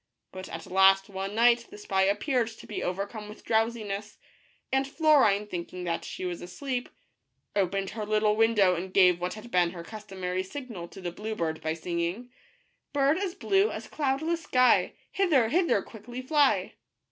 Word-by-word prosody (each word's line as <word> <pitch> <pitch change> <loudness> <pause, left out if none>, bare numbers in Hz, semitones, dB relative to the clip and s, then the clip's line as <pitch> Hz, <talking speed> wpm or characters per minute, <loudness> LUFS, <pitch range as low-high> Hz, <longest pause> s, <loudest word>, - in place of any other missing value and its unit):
But 185 0 -8
at 165 - -7
last 195 +1 +4
one 195 +1 -4
night 235 +1 +4
the - - -11
spy 190 -2 +1
appeared 230 +5 +1
to 225 - -11
be 210 - -5
overcome 200 +3 -4
with 210 - -12
drowsi 225 0 +1
ness, 205 +1 -5 0.5
and 270 0 +1
Florine, 275 -10 +4
thinking 180 -2 -6
that 170 -1 -2
she 185 - -6
was 175 -1 -4
asleep, 250 +7 -4 0.7
opened 195 0 0
her 215 -1 -4
little 210 0 +2
window, 215 -4 +4
and 180 +2 -4
gave 180 -2 +5
what 180 +2 -2
had 220 +2 -11
been 175 -1 +3
her 170 -2 -7
customary 190 -3 -4
signal 195 -3 -7
to 195 - -12
the 175 -1 -3
blue 215 +5 -5
bird 160 -4 -2
by 160 0 -1
singing: 170 +8 -3 0.3
" - - -44
Bird 285 +3 +3
as 385 -3 -3
blue 390 +2 +2
as - - -6
cloudless 310 +4 -1
sky, 255 -5 +3 0.2
Hither, 300 - +3
hither 335 - +2
quickly 240 +3 -9
fly 290 0 +2
210 Hz, 175 wpm, -28 LUFS, 185-250 Hz, 0.7 s, gave